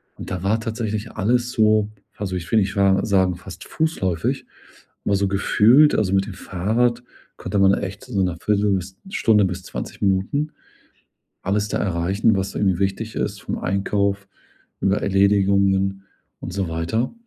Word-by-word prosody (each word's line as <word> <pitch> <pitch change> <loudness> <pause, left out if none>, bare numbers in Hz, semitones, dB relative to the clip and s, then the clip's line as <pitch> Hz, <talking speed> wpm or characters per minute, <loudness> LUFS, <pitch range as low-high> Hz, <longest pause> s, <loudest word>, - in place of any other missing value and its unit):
Und, - - -9
da 90 0 -4
war 110 +3 +1
tatsächlich 110 -1 -4
alles 120 +4 0
so, 110 -2 +3 0.3
also, 95 -2 -3
ich 85 - -6
finde 110 +4 +3
ich 95 +2 -4
war 95 -1 +3
sagen 95 -3 +2
fast 95 +1 -10
fußläufig 95 - -1 0.6
immer 100 - +2
so 100 0 +1
gefühlt. 115 +8 +4
Also, 95 -3 +1
mit 95 0 +2
dem - - -6
Fahrrad 115 +6 0 0.3
konnte 100 - -2
man 95 0 +5
echt 100 +1 -4
so 100 - -1
‘ner 90 -2 -1
Viertel 105 -1 +1
bis 95 0 -4
Stunde 110 - +3
bis 95 0 -4
20 - - -7
Minuten, 100 +10 0 0.9
alles 105 +2 0
da - - -1
erreichen, 95 +4 +1
was 95 0 -3
irgendwie 95 -3 +1
wichtig 100 +3 -2
ist - - -3
vom - - -4
Einkauf 100 +1 -1 0.5
über 95 +1 +1
Erledigungen 95 0 +2 0.4
und - - -6
so 95 -3 -2
weiter. 85 +9 -1
100 Hz, 160 wpm, -22 LUFS, 95-110 Hz, 0.9 s, man